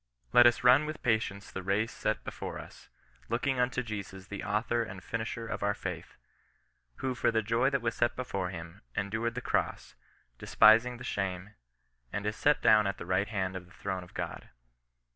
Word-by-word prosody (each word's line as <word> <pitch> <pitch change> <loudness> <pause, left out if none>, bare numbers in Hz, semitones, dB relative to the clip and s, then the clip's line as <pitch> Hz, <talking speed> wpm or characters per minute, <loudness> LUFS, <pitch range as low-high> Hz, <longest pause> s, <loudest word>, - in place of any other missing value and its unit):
Let 120 0 +9
us 120 - +2
run 130 +5 +6
with 155 0 -6
patience 110 -5 0
the 95 - -5
race 100 +5 0
set 110 0 -2
before - - -6
us, - - -12 0.4
looking 125 +3 0
unto 125 +1 +1
Jesus 100 -4 -6
the 100 - -5
author 110 +3 0
and 95 -5 -6
finisher 115 +3 -4
of - - -4
our 100 0 +1
faith; - - -6 0.8
who 130 - -2
for - - +1
the 110 -1 +1
joy 115 +5 +2
that 135 -3 -1
was 115 - 0
set 120 - +1
before 100 -8 -3
him, 85 -2 -8
en 100 0 -2
dured 115 +2 -1
the 125 - -3
cross, - - -1 0.5
despising 120 +3 +5
the 125 - -9
shame, 95 +1 -3 0.6
and 105 0 -3
is 105 +1 -1
set 150 0 +2
down 105 -2 +6
at 100 - -2
the - - -7
right 95 +3 +1
hand 95 -3 -2
of 90 -1 -7
the 90 - -19
throne 95 -2 -4
of 90 - -16
God." - - -5
110 Hz, 195 wpm, -30 LUFS, 95-120 Hz, 0.8 s, Let